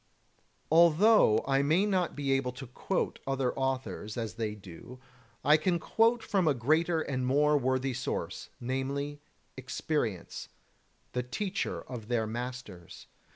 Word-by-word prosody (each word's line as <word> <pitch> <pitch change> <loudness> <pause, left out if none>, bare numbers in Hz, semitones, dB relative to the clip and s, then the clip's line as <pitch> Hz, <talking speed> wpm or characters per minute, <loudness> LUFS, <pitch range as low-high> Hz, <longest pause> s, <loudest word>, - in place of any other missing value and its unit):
25. - - -39
Although 170 - +5
I 135 0 +3
may 160 +8 +3
not 185 -4 0
be 140 -2 -1
able 135 -2 +1
to 135 +2 -8
quote 120 - -2
other 135 -2 0
authors, 130 -5 -3
as 115 -2 -3
they 110 -2 -3
do, 100 +6 -12 0.5
I 150 +2 +7
can 175 +3 +1
quote 225 +6 +2
from 190 -4 +1
a 145 - +3
greater 160 +7 +2
and 130 -4 -2
more 145 +4 +3
worthy 130 -1 +1
source, 125 - -4
namely, 140 +3 -3 0.3
experience, 130 - -3 0.6
the 125 - -1
teacher 195 - -3
of 120 -5 -8
their 120 -2 0
masters. 115 -6 -7
135 Hz, 140 wpm, -30 LUFS, 125-155 Hz, 0.6 s, I